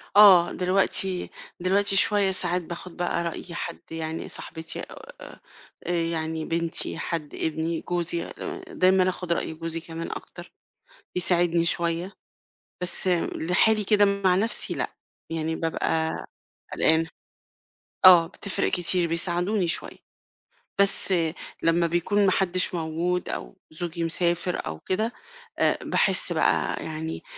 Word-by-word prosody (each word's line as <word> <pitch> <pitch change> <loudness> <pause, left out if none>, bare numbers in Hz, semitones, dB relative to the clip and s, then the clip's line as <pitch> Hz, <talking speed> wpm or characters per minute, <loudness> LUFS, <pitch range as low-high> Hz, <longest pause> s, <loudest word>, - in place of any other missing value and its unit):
آه، 195 -4 +8
دلوقتي 185 0 +1 0.3
دلوقتي 195 +2 +2
شوية 200 -1 +4
ساعات 180 -1 +3
باخُد 170 +1 -9
بقى 175 -1 -1
رأي 170 +1 -6
حد 170 0 -5
يعني 160 0 -5
صاحبتي 160 0 -4
آآ - - -11 0.5
آآ - - 0
يعني 160 -2 -2
بنتي، 165 0 -1
حد، 160 -4 -4
ابني، 160 +1 -2
جوزي 175 -1 -2
آآ 380 - -7
دايمًا 190 - +3
آخُد 180 -2 -2
رأي 165 - -3
جوزي 165 +1 -4
كمان 165 0 -7
أكتر، - - -9 0.6
بيساعدني 175 -2 +2
شوية. 170 +3 0 0.7
بس 180 +1 +2 0.3
لحالي 210 +6 +2
كده 205 0 +4
مع 200 -2 +2
نَفْسي 220 +5 0
لأ، - - -4 0.4
يعني 160 0 -2
بابقى 160 0 -1 0.6
قلقانة. 160 +1 +2 1.0
آه، 175 -3 +9
بتفرِق 195 +2 -2
كتير 175 -1 +2
بيساعدوني 175 +3 +2
شوية. 165 - -3 0.8
بس 200 -1 +3 0.5
لمّا 170 +1 +3
بيكون 175 +5 +1
ما 190 - +3
حدّش 185 -1 0
موجود 170 +2 -2
أو - - -6
زوجي 170 +1 -5
مسافر 175 +2 -1
أو 80 - -6
كده، 220 +5 -2 0.5
آآ - - +3
باحس - - +2
بقى - - +1
يعني 160 +1 -5
175 Hz, 125 wpm, -25 LUFS, 165-185 Hz, 1.0 s, آه